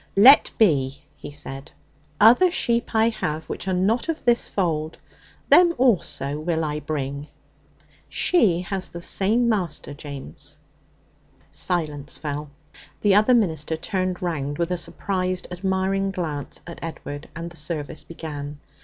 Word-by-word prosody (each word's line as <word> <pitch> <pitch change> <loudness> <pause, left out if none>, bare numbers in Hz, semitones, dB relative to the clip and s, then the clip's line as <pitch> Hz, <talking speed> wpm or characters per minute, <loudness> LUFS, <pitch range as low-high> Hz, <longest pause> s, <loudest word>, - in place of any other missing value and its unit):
'Let 250 +9 +8
be,' 140 -10 +2
he 145 0 -9
said. 140 0 -6 0.5
'"Other 245 - +7
sheep 235 -8 0
I 220 +1 +4
have 155 -8 -3
which - - -5
are 190 - +1
not 210 - +1
of 325 -3 -3
this 240 -1 +3
fold. 160 -5 -1 0.5
Them 345 -1 +6
also 170 - +1
will 160 0 -1
I 150 0 -2
bring." 140 -1 -4 0.8
She 195 - +3
has 185 0 -4
the 170 - -8
same 215 +7 +2
master, 180 -10 -1
James.' 140 - -9 0.9
Silence 150 -5 -2
fell. 150 -1 -4 0.5
The 205 -2 +4
other 215 +5 +5
minister 160 -7 0
turned 185 +1 -2
round 145 -4 -2
with 170 +1 -1
a - - +2
surprised, 185 +1 -2
admiring 190 +1 0
glance 160 -7 -5
at 170 - -9
Edward, 145 -2 -7
and 170 +1 -6
the - - -13
service 155 0 -4
began. 150 -3 -7
170 Hz, 135 wpm, -23 LUFS, 150-195 Hz, 0.9 s, Let